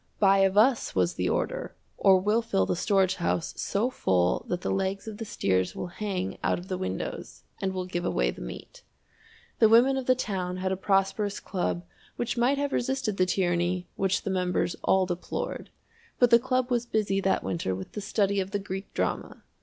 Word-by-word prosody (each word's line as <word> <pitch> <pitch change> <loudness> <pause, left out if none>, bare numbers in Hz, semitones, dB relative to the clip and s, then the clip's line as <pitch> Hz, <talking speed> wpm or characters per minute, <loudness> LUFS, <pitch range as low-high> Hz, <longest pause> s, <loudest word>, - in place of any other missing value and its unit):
"Buy 195 -1 +5
of 195 0 +3
us," 235 +3 +3
was 90 -2 +2
the 90 +1 -1
order, - - -2 0.2
"or 190 -1 +5
we'll 210 +5 +2
fill 95 - +1
the - - 0
storage 190 0 +2
house 170 -1 -1
so 225 +6 -1
full 90 - +1
that 180 0 -1
the - - -2
legs 195 +1 -2
of 215 -2 -6
the 225 - -4
steers 95 - 0
will - - -4
hang 190 -3 -2
out - - +2
of 180 +3 -10
the 185 - -1
windows, 95 0 -5 0.2
and 190 - 0
we'll 185 -1 -3
give 175 -1 -3
away - - +1
the - - -11
meat." - - -9 0.8
The 220 - +6
women 250 +4 +5
of 265 - -4
the 255 - +5
town 185 -7 -3
had 185 0 -1
a - - +1
prosperous 195 +1 0
club 175 -2 -2 0.3
which 240 0 -2
might 250 +4 +2
have 285 0 -1
resisted 245 -5 -1
the 185 - +3
tyranny 175 -1 0
which 190 -1 0
the 195 - -2
members 180 -1 0
all 190 -1 +3
deplored, 175 -1 -4 0.5
but 245 -1 +4
the 235 - +8
club 255 0 0
was 240 -1 0
busy 200 -3 0
that 190 - +1
winter 130 - -2
with 95 0 -8
the 210 - -5
study 200 0 +1
of 190 0 -2
the 205 - -1
Greek 195 0 -6
drama! - - -2
195 Hz, 200 wpm, -27 LUFS, 180-220 Hz, 0.8 s, the